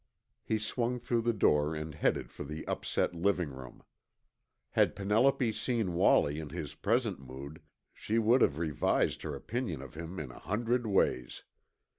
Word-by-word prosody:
He 110 Hz, -, 0 dB
swung 120 Hz, +3 st, -1 dB
through 120 Hz, -1 st, 0 dB
the 120 Hz, +1 st, +2 dB
door 75 Hz, -7 st, +2 dB
and 75 Hz, 0 st, -5 dB
headed 75 Hz, -, 0 dB
for -, -, -7 dB
the 75 Hz, +2 st, -7 dB
upset -, -, -1 dB
living 90 Hz, -1 st, +1 dB
room. 65 Hz, -2 st, -11 dB, 0.9 s
Had -, -, +3 dB
Penelope 115 Hz, +5 st, +3 dB
seen 110 Hz, -5 st, -1 dB
Wallie 75 Hz, -3 st, +4 dB
in 75 Hz, -2 st, -6 dB
his 75 Hz, -2 st, -5 dB
present 110 Hz, -, 0 dB
mood, 70 Hz, +5 st, -9 dB, 0.3 s
she 110 Hz, -, -2 dB
would 115 Hz, +3 st, +4 dB
have 70 Hz, -, +3 dB
revised 80 Hz, -4 st, +1 dB
her 75 Hz, -, -4 dB
opinion 95 Hz, -, -3 dB
of 70 Hz, -2 st, -9 dB
him 85 Hz, +4 st, -6 dB
in 70 Hz, -5 st, -5 dB
a -, -, -12 dB
hundred 115 Hz, +5 st, 0 dB
ways. 95 Hz, -10 st, +1 dB
90 Hz, 160 wpm, -31 LUFS, 75-115 Hz, 0.9 s, Wallie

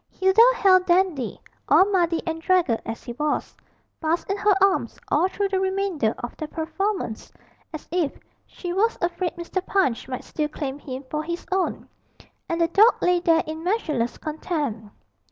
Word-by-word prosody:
Hilda 380 Hz, +3 st, +3 dB
held 370 Hz, -4 st, +4 dB
Dandy, 345 Hz, -, +1 dB, 0.3 s
all 375 Hz, -, +7 dB
muddy 350 Hz, -4 st, +1 dB
and 325 Hz, -1 st, -3 dB
draggled 340 Hz, -10 st, +2 dB
as 225 Hz, -, -5 dB
he 240 Hz, -, -6 dB
was, 300 Hz, +4 st, -2 dB, 0.5 s
fast 325 Hz, +1 st, 0 dB
in 395 Hz, -, -1 dB
her 410 Hz, 0 st, +3 dB
arms 390 Hz, 0 st, +2 dB
all 365 Hz, -, +3 dB
through 395 Hz, +1 st, -2 dB
the 385 Hz, -1 st, 0 dB
remainder 380 Hz, -, 0 dB
of 240 Hz, -, -5 dB
the 310 Hz, -, -4 dB
performance, 330 Hz, -, -3 dB, 0.4 s
as 310 Hz, -2 st, -8 dB
if 345 Hz, -5 st, 0 dB, 0.3 s
she 355 Hz, -1 st, -6 dB
was 445 Hz, +5 st, +1 dB
afraid 345 Hz, 0 st, -2 dB
Mr. 345 Hz, +2 st, -4 dB
Punch 320 Hz, -15 st, 0 dB
might 255 Hz, -1 st, -5 dB
still 300 Hz, -1 st, -3 dB
claim 285 Hz, -2 st, -5 dB
him 265 Hz, -1 st, -7 dB
for 300 Hz, -, -1 dB
his 340 Hz, +2 st, -5 dB
own; 375 Hz, 0 st, -1 dB, 0.6 s
and 335 Hz, -, -1 dB
the 335 Hz, -, +3 dB
dog 430 Hz, +7 st, +6 dB
lay 360 Hz, 0 st, +3 dB
there 330 Hz, -1 st, +3 dB
in 315 Hz, +1 st, -6 dB
measureless 310 Hz, -, -1 dB
content. 295 Hz, -, -4 dB
345 Hz, 170 wpm, -24 LUFS, 300-380 Hz, 0.6 s, all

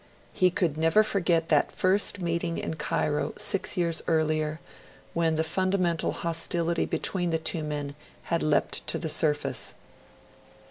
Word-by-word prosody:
He 185 Hz, -, +4 dB
could 170 Hz, -4 st, -1 dB
never 165 Hz, +7 st, +4 dB
forget 175 Hz, -5 st, +1 dB
that 150 Hz, -2 st, +3 dB
first 195 Hz, +2 st, +2 dB
meeting 170 Hz, -1 st, -2 dB
in -, -, -3 dB
Cairo, 150 Hz, -1 st, -1 dB
six 195 Hz, 0 st, 0 dB
years 170 Hz, -2 st, +1 dB
earlier, 155 Hz, -1 st, 0 dB, 0.5 s
when 165 Hz, -1 st, +1 dB
the 160 Hz, -, +1 dB
fundamental 180 Hz, -1 st, 0 dB
hostility 170 Hz, 0 st, 0 dB
between 175 Hz, -2 st, -1 dB
the 165 Hz, -, +1 dB
two 160 Hz, 0 st, -1 dB
men 145 Hz, -2 st, -4 dB, 0.3 s
had 170 Hz, -, -1 dB
leapt 150 Hz, -1 st, 0 dB
to -, -, -1 dB
the 160 Hz, -, -3 dB
surface. 150 Hz, -4 st, +1 dB
165 Hz, 140 wpm, -27 LUFS, 155-175 Hz, 0.5 s, He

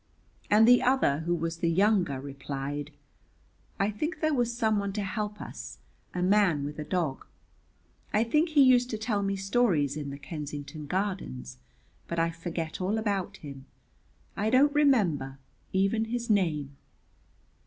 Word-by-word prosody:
And 215 Hz, +2 st, +6 dB
the 245 Hz, 0 st, +7 dB
other 250 Hz, -, +2 dB
who 175 Hz, -, +2 dB
was 165 Hz, 0 st, -3 dB
the 170 Hz, 0 st, 0 dB
younger, 185 Hz, -6 st, +2 dB
replied, 140 Hz, +1 st, -5 dB, 0.9 s
'I 200 Hz, +2 st, +2 dB
think 305 Hz, -, -3 dB
there 310 Hz, -1 st, +1 dB
was 240 Hz, -3 st, +1 dB
someone 220 Hz, -4 st, 0 dB
to 205 Hz, 0 st, -2 dB
help 210 Hz, +1 st, -3 dB
us, -, -, -8 dB, 0.3 s
a 180 Hz, -, -2 dB
man 185 Hz, -6 st, +3 dB
with 145 Hz, +2 st, -5 dB
a -, -, -2 dB
dog. 155 Hz, -3 st, -2 dB, 0.8 s
I 215 Hz, -, +3 dB
think 300 Hz, +8 st, +2 dB
he 300 Hz, -3 st, +5 dB
used 250 Hz, -1 st, +5 dB
to 220 Hz, -, -3 dB
tell 215 Hz, -1 st, -1 dB
me 195 Hz, 0 st, -1 dB
stories 195 Hz, -, +1 dB
in 145 Hz, -2 st, -4 dB
the 140 Hz, -, -6 dB
Kensington 145 Hz, 0 st, -7 dB
Gardens, 140 Hz, -, -3 dB, 0.5 s
but 170 Hz, -, -4 dB
I 165 Hz, 0 st, +2 dB
forget 165 Hz, 0 st, -5 dB
all 195 Hz, +4 st, 0 dB
about 200 Hz, -4 st, -2 dB
him; 140 Hz, -2 st, -10 dB, 0.7 s
I 210 Hz, +2 st, 0 dB
don't 275 Hz, +4 st, +4 dB
remember 190 Hz, -, +2 dB, 0.3 s
even 195 Hz, +4 st, +1 dB
his 235 Hz, 0 st, -2 dB
name.'" 155 Hz, -8 st, 0 dB
190 Hz, 155 wpm, -28 LUFS, 150-220 Hz, 0.9 s, the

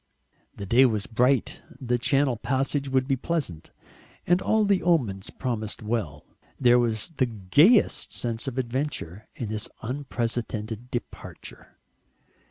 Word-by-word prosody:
The 100 Hz, -, -6 dB
day 125 Hz, +7 st, +5 dB
was 105 Hz, -4 st, -1 dB
bright, 125 Hz, +3 st, +1 dB, 0.2 s
the 125 Hz, -2 st, 0 dB
Channel 135 Hz, 0 st, +2 dB
passage 135 Hz, +3 st, -1 dB
would 130 Hz, -1 st, +1 dB
be 135 Hz, -, +2 dB
pleasant, 130 Hz, -, -3 dB, 0.6 s
and 175 Hz, +2 st, +3 dB
all 220 Hz, -1 st, +2 dB
the 200 Hz, -2 st, +2 dB
omens 120 Hz, -, +1 dB
promised 110 Hz, -5 st, -4 dB
well. 105 Hz, -10 st, -3 dB, 0.3 s
There 125 Hz, -2 st, +5 dB
was 115 Hz, +2 st, -1 dB
the 130 Hz, -, +3 dB
gayest 120 Hz, -, +3 dB
sense 120 Hz, +2 st, -2 dB
of 130 Hz, -1 st, -4 dB
adventure 120 Hz, -, -3 dB
in 115 Hz, -, -5 dB
this 110 Hz, 0 st, -3 dB
unprecedented 120 Hz, -3 st, -3 dB
departure. 120 Hz, -, -8 dB
120 Hz, 130 wpm, -26 LUFS, 110-135 Hz, 0.6 s, day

